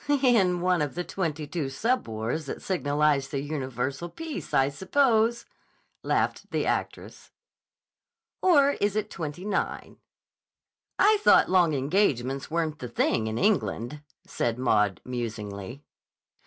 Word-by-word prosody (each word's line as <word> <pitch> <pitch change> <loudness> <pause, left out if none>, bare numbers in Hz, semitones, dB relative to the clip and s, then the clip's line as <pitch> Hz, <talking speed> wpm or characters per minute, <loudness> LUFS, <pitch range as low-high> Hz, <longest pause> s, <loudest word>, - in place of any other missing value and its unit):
"In 235 -11 +3
one 180 -2 +2
of 145 -2 -2
the 175 - -2
twenty 160 -5 -3
two 145 -2 -3
sub 230 - 0
wars 115 +7 -3
that - - -6
signalize 145 -5 +1
the 140 - -3
universal 140 +1 -3
peace, 325 - -7
I 135 +1 +3
suppose," 230 - +1 0.6
laughed - - -1
the - - -1
actress. - - -4 1.1
"Or 285 -6 +5
is 205 0 +1
it 215 0 -2
twenty 165 +1 -6
nine." 205 -2 -3 1.0
"I 425 0 +5
thought 420 - +5
long 175 -5 +4
engagements 135 - 0
weren't 160 -2 -2
the 125 - -6
thing 110 -1 0
in 110 +1 -3
England," 150 - 0 0.2
said 115 -1 -2
Maud, 105 -7 +1
musingly. 115 0 -5
150 Hz, 130 wpm, -27 LUFS, 130-195 Hz, 1.1 s, Or